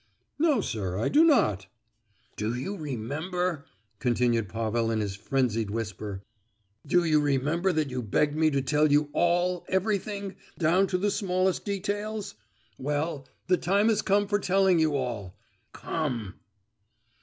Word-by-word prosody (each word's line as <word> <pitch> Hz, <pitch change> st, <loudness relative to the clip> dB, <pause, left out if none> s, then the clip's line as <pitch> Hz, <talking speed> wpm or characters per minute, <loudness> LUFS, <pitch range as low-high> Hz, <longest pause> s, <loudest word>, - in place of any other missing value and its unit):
"No, 305 Hz, -3 st, +3 dB
sir, 95 Hz, -4 st, -3 dB
I 110 Hz, -, 0 dB
do 305 Hz, +3 st, +5 dB
not!" 105 Hz, -, +3 dB, 0.7 s
"Do 110 Hz, +3 st, -2 dB
you 135 Hz, +12 st, -4 dB
remember," 155 Hz, -, -3 dB, 0.3 s
continued 120 Hz, -4 st, +1 dB
Pavel 115 Hz, 0 st, -1 dB
in 110 Hz, -1 st, 0 dB
his 100 Hz, -2 st, -2 dB
frenzied 115 Hz, -1 st, 0 dB
whisper, 105 Hz, -2 st, -5 dB, 0.6 s
"do 175 Hz, +4 st, +3 dB
you 155 Hz, -2 st, +3 dB
remember 145 Hz, +6 st, +1 dB
that 155 Hz, -4 st, 0 dB
you 125 Hz, 0 st, -2 dB
begged 145 Hz, +7 st, +1 dB
me 155 Hz, 0 st, +3 dB
to 140 Hz, -2 st, 0 dB
tell 150 Hz, +2 st, +2 dB
you 145 Hz, 0 st, +3 dB
all, 175 Hz, +1 st, +1 dB
everything—down 195 Hz, -3 st, 0 dB
to 185 Hz, -, 0 dB
the 205 Hz, +2 st, 0 dB
smallest 185 Hz, -2 st, 0 dB
details? 205 Hz, +1 st, -3 dB, 0.5 s
Well, 145 Hz, 0 st, -2 dB, 0.2 s
the 180 Hz, -, +3 dB
time 200 Hz, +6 st, +2 dB
has 220 Hz, -1 st, +2 dB
come 205 Hz, +1 st, +2 dB
for 205 Hz, +1 st, +1 dB
telling 190 Hz, -2 st, +3 dB
you 155 Hz, -2 st, +2 dB
all—come!" 120 Hz, -, -5 dB
155 Hz, 135 wpm, -27 LUFS, 120-190 Hz, 0.7 s, do